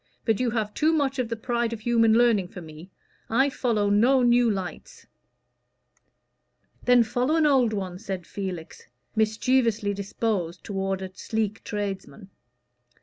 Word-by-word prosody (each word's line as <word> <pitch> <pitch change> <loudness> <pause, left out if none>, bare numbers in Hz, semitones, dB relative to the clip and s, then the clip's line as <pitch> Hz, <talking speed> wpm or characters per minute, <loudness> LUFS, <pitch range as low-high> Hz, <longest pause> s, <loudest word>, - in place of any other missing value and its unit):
But 225 -3 +1
you 250 -1 +1
have 220 -2 -2
too 315 +1 +2
much 275 -3 0
of 245 -3 -1
the 230 - -2
pride 235 +1 -1
of 220 - -7
human 230 -1 +3
learning 225 -5 +3
for 180 - -10
me. 160 +1 -11 0.4
I 265 +5 +2
follow 215 -6 0
no 250 +5 +4
new 240 0 +4
lights." 200 - -5 1.8
"Then 245 -1 +6
follow 250 +7 0
an 320 -1 +3
old 260 -6 +4
one," 185 -4 -4
said 190 -5 -5
Felix, 185 -5 -7 0.3
mischievously 220 -1 +1
disposed 200 -3 -3
toward 195 -2 -3
a 185 0 -8
sleek 220 +1 -3
tradesman. 200 -1 -5
220 Hz, 145 wpm, -25 LUFS, 195-245 Hz, 1.8 s, Then